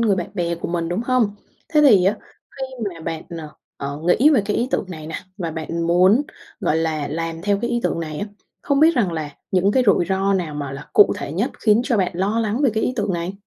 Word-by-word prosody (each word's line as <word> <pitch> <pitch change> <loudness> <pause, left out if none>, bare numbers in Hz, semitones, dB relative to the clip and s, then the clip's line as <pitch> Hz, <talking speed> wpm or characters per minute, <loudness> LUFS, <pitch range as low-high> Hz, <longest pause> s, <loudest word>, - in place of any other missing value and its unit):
người 215 -4 +3
bạn 180 +1 -4
bè 170 -2 -1
của 170 - -6
mình, 170 -1 -2
đúng 175 +5 -1
hông? 240 -5 +2 0.3
Thế 305 -2 +3
thì 215 -11 +6
á 200 +3 +2 0.4
khi 265 - -3 0.3
mà 165 - -11
bạn, 160 0 -4 0.2
ờ, 155 -2 -7 0.3
ờ, 140 +1 -5
nghĩ 260 +12 +5
về 250 -9 +4
cái 210 0 -1
ý 240 +2 0
tưởng - - 0
này 155 -3 -7
nè 160 - -7 0.2
và 170 -5 -3
bạn 165 +1 -3
muốn, 185 +9 +4 0.4
gọi 155 - +1
là, 155 -3 -1
làm 165 +2 -4
theo 200 0 +1
cái 235 - -2
ý 240 0 0
tưởng - - -1
này 155 -2 -5
á, 205 - -3 0.4
không 280 0 +1
biết 325 +2 +6
rằng 195 -8 +2
là 155 -2 -4 0.2
những 190 +2 +2
cái 255 - +3
rủi 185 -3 +4
ro 195 +1 +1
nào 165 -5 -2
mà 145 -2 -4
là 135 +1 -9
cụ 415 - +6
thể - - -5
nhất - - -1
khiến 215 0 +4
cho 245 -5 +1
bạn 185 -2 +1
lo 200 +6 0
lắng 220 +3 -1
về 265 - +4
cái 220 - 0
ý 250 - 0
tưởng 205 -3 0
này? 170 +2 -3
185 Hz, 260 wpm, -21 LUFS, 165-220 Hz, 0.4 s, thì